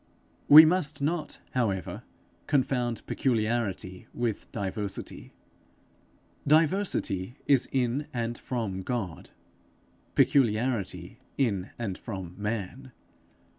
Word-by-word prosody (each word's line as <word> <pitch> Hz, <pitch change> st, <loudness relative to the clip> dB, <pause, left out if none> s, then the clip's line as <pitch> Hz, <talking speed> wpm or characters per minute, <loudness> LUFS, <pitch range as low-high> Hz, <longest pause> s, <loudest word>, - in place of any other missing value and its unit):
We 155 Hz, +2 st, +11 dB
must 155 Hz, -3 st, +1 dB
not 155 Hz, +3 st, -2 dB
however 100 Hz, -8 st, -1 dB, 0.5 s
confound 125 Hz, -4 st, 0 dB
peculiarity 110 Hz, -6 st, -1 dB
with 120 Hz, -3 st, -3 dB
diversity. 100 Hz, 0 st, -5 dB, 1.2 s
Diversity 150 Hz, -, +1 dB
is 135 Hz, -3 st, +3 dB
in 130 Hz, +2 st, 0 dB
and 120 Hz, -2 st, -2 dB
from 115 Hz, -7 st, -3 dB
God; 95 Hz, -4 st, -4 dB, 0.9 s
peculiarity 115 Hz, -, +1 dB, 0.2 s
in 105 Hz, -8 st, 0 dB
and 105 Hz, -6 st, -4 dB
from 95 Hz, -6 st, -6 dB
man. 110 Hz, +5 st, -4 dB
120 Hz, 85 wpm, -28 LUFS, 100-135 Hz, 1.2 s, We